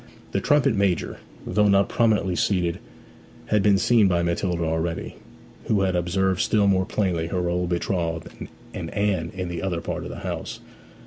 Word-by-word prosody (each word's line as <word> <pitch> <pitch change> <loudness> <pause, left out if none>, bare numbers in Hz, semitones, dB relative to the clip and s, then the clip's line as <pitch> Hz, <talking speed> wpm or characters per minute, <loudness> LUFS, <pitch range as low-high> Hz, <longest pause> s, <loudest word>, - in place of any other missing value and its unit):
The - - 0
trumpet 145 -3 +3
major, 100 -4 0 0.3
though 105 0 +2
not 100 -1 +4
prominently 105 -6 +1
seated, 85 -3 0 0.7
had 105 -1 +3
been 100 -1 +4
seen 110 0 +4
by 85 -2 +1
Matilda 85 0 -1
already, 80 +1 -2 0.5
who 105 -3 +1
had 95 -1 +1
observed 95 +2 +1
still 105 -2 +2
more 95 -1 +3
plainly 90 -7 -1
her 90 0 -1
old 90 0 -1
betrothed 85 -2 -2 0.4
and - - -5
Anne 95 -5 0
in 90 -1 -3
the 85 -1 -4
other 90 -3 -1
part 85 - -4
of - - -6
the - - -8
house. - - -4
95 Hz, 170 wpm, -24 LUFS, 85-100 Hz, 0.7 s, not